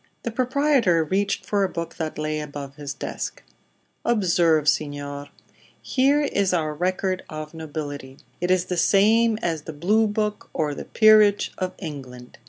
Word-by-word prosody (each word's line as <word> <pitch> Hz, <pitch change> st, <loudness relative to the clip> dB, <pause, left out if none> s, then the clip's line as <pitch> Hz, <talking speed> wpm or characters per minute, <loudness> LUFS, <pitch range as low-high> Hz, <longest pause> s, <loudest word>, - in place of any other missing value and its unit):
The 235 Hz, -, -3 dB
proprietor 255 Hz, -, +2 dB
reached 195 Hz, +5 st, -1 dB
for 200 Hz, -1 st, +1 dB
a 190 Hz, -, +1 dB
book 170 Hz, -2 st, -6 dB
that 160 Hz, -2 st, -4 dB
lay 155 Hz, 0 st, -2 dB
above 145 Hz, -2 st, -7 dB
his 145 Hz, -2 st, -6 dB
desk. -, -, -5 dB, 0.6 s
"Observe, 170 Hz, -8 st, +2 dB
signor. 145 Hz, -1 st, -1 dB, 0.5 s
Here 280 Hz, +3 st, +2 dB
is 200 Hz, -9 st, +1 dB
our 155 Hz, -3 st, -1 dB
record 185 Hz, +3 st, -1 dB
of 155 Hz, 0 st, -7 dB
nobility. 145 Hz, -4 st, -6 dB, 0.2 s
It 175 Hz, -, -1 dB
is 185 Hz, -1 st, +3 dB
the 180 Hz, -, -3 dB
same 220 Hz, +5 st, +4 dB
as 165 Hz, -3 st, -1 dB
the 160 Hz, -, -6 dB
'Blue 210 Hz, +9 st, +2 dB
Book' 210 Hz, 0 st, -2 dB
or 150 Hz, -2 st, -1 dB
the -, -, -7 dB
'Peerage' 215 Hz, -2 st, +5 dB
of 185 Hz, -1 st, -2 dB
England. 130 Hz, -7 st, -9 dB
175 Hz, 155 wpm, -24 LUFS, 150-210 Hz, 0.6 s, Peerage